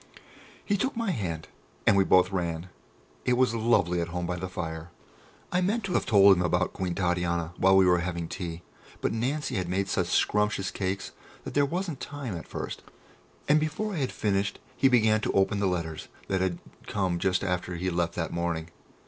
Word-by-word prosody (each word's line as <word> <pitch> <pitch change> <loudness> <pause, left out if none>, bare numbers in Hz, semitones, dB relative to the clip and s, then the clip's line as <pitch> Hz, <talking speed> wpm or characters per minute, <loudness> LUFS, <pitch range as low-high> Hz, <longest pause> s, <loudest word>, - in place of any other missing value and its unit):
He 205 - +1
took 260 +5 -1
my 230 -4 0
hand, 85 - -3 0.4
and 105 - +6
we 100 - +5
both 90 0 +4
ran; 85 -1 -2 0.5
it 125 - +2
was 125 -2 +3
lovely 100 -7 +2
at 85 - -2
home 90 +1 -3
by 90 +1 -2
the 95 +1 -4
fire. 80 -2 -5 0.6
I 180 - +2
meant 210 +5 0
to 190 -2 -3
have - - +1
told 100 -3 +7
him 90 - -1
about 90 - +1
Queen 90 -2 -2
Titania 90 -2 0
while 95 +1 +5
we 95 - +6
were 90 -1 +4
having 85 -1 -3
tea, 85 -1 -6 0.4
but - - -1
Nancy 130 +2 -1
had 90 -2 -2
made 95 +2 0
such 95 -2 0
scrumptious 105 0 +1
cakes 95 0 -3 0.3
that - - -7
there 145 0 +3
wasn't 170 -2 -3
time 140 -9 -5
at 85 - -7
first, - - -5 0.7
and 150 +1 +5
before 155 +8 -2
I - - -3
had 135 -4 -1
finished 100 -1 0 0.2
he 135 - +4
began 110 -4 +4
to - - -1
open 100 +1 +2
the 100 - +2
letters 85 -3 -3 0.2
that 95 -1 +1
had 95 -2 0 0.3
come 95 -4 0
just 95 +1 +1
after 90 -1 -2
he 90 +2 -2
left 85 0 -1
that 80 - -3
morning. 85 -1 -2
95 Hz, 200 wpm, -28 LUFS, 85-120 Hz, 0.7 s, told